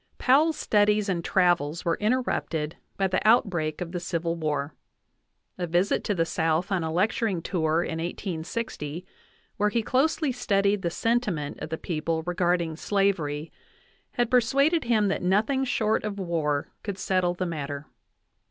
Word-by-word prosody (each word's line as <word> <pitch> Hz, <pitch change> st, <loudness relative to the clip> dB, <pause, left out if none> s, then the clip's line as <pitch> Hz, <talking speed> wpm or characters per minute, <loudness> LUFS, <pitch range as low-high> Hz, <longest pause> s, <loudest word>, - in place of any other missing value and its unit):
Powell's 300 Hz, +5 st, +4 dB
studies 210 Hz, 0 st, +2 dB
and 170 Hz, -3 st, -1 dB
travels 170 Hz, -4 st, +1 dB
were 170 Hz, -, 0 dB
interrupted 210 Hz, -9 st, -1 dB, 0.2 s
by 195 Hz, -, +1 dB
the 185 Hz, -, 0 dB
out 220 Hz, -2 st, +5 dB
break 155 Hz, -2 st, -2 dB
of 170 Hz, -1 st, -4 dB
the 175 Hz, -, -3 dB
Civil 170 Hz, -1 st, -2 dB
War. 150 Hz, -3 st, -2 dB, 0.9 s
A 175 Hz, -, -1 dB
visit 175 Hz, +4 st, +1 dB
to 205 Hz, -, 0 dB
the 165 Hz, -2 st, +1 dB
South 165 Hz, +4 st, 0 dB
on 185 Hz, -3 st, +1 dB
a 160 Hz, -, -2 dB
lecturing 190 Hz, 0 st, 0 dB
tour 160 Hz, -2 st, +1 dB
in 165 Hz, -2 st, -4 dB
1860, 170 Hz, -1 st, -4 dB, 0.5 s
where. 210 Hz, 0 st, +2 dB
he 230 Hz, +2 st, 0 dB
closely 290 Hz, +4 st, +1 dB
studied 200 Hz, -4 st, +1 dB
the 170 Hz, -, 0 dB
sentiment 205 Hz, -8 st, -1 dB
of -, -, -6 dB
the 160 Hz, -, -3 dB
people 160 Hz, -1 st, -2 dB
regarding 175 Hz, -2 st, 0 dB
slavery, 165 Hz, -7 st, 0 dB, 0.6 s
had 240 Hz, -2 st, 0 dB
persuaded 275 Hz, +6 st, +3 dB
him 220 Hz, -3 st, +3 dB
that -, -, -1 dB
nothing 215 Hz, +9 st, +2 dB
short 220 Hz, -4 st, +1 dB
of 210 Hz, -1 st, -4 dB
war 160 Hz, -6 st, -1 dB
could 200 Hz, -3 st, -5 dB
settle 185 Hz, -2 st, +1 dB
the 185 Hz, -, -2 dB
matter. 145 Hz, -4 st, -4 dB
180 Hz, 155 wpm, -26 LUFS, 165-215 Hz, 0.9 s, out